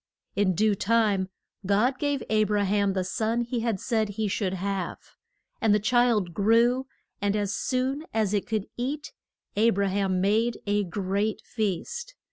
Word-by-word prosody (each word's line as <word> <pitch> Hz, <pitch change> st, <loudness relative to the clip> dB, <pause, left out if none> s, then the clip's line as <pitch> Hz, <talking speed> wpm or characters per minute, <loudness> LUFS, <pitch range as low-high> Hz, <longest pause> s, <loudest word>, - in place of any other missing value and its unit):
In 200 Hz, -3 st, +2 dB
due 215 Hz, +3 st, +3 dB
time 200 Hz, -2 st, +2 dB, 0.3 s
God 215 Hz, +7 st, +2 dB
gave 285 Hz, -2 st, 0 dB
A 215 Hz, 0 st, +3 dB
bra 205 Hz, 0 st, +1 dB
ham 200 Hz, 0 st, +2 dB
the 190 Hz, -1 st, 0 dB
son 220 Hz, +5 st, 0 dB
he 240 Hz, 0 st, -2 dB
had 225 Hz, -4 st, -1 dB
said 220 Hz, -1 st, 0 dB
he 210 Hz, +1 st, -2 dB
should 190 Hz, -1 st, -1 dB
have. 190 Hz, -1 st, -2 dB, 0.6 s
And 220 Hz, -2 st, +4 dB
the -, -, +3 dB
child 225 Hz, -5 st, +2 dB
grew, 235 Hz, +6 st, +3 dB, 0.3 s
and 205 Hz, 0 st, +1 dB
as 205 Hz, -1 st, 0 dB
soon 265 Hz, +7 st, -1 dB
as 215 Hz, -2 st, 0 dB
it 205 Hz, -, 0 dB
could 215 Hz, -3 st, -1 dB
eat, 280 Hz, +5 st, -3 dB, 0.4 s
A 225 Hz, +3 st, +4 dB
bra 200 Hz, -2 st, +1 dB
ham 190 Hz, -1 st, 0 dB
made 220 Hz, +5 st, +2 dB
a 205 Hz, 0 st, +1 dB
great 200 Hz, +4 st, -1 dB
feast. 360 Hz, -, -3 dB
210 Hz, 165 wpm, -27 LUFS, 200-235 Hz, 0.6 s, And